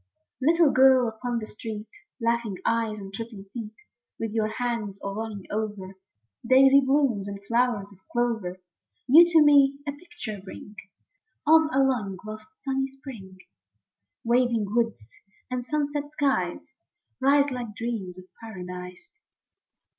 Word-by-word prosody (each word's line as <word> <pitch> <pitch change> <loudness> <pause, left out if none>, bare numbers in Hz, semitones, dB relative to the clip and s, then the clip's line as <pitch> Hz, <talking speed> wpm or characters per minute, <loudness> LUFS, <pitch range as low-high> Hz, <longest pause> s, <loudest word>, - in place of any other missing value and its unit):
ITTLE 325 +1 +4
girl 260 -1 +6
upon 235 +2 -3
the 220 - -4
street, 215 0 -7 0.3
Laughing 230 -3 0
eyes 225 -2 0
and 195 -1 -9
tripping 220 -2 -7
feet, 225 -3 -7 0.4
With 225 -1 -3
your 220 -1 0
hands 220 -3 -3
all 200 - -5
running 210 -2 -5
over 205 -3 -4 0.5
Daisy 265 +3 +6
blooms 265 -7 +1
and 200 0 -6
flowers 230 -3 0
of 190 - -21
clover, 225 -7 -1 0.5
You 320 +7 +8
to 330 -3 +6
me 280 -2 +5
a - - 0
picture 285 - -8
bring 205 +2 -11 0.7
Of 320 0 +6
a 270 -2 +3
long 215 -8 0
lost 215 0 -8 0.2
sunny 270 -1 -1
spring; 255 -9 -11 0.9
Waving 235 -3 +1
woods 230 -2 +1 0.5
and 250 -1 -2
sunset 290 +1 -2
skies 275 -4 -1 0.5
Rise 280 +1 +4
like 240 -4 -5
dreams 210 -6 -4
of 185 - -11 0.2
paradise. 180 - -9
235 Hz, 130 wpm, -26 LUFS, 210-270 Hz, 0.9 s, You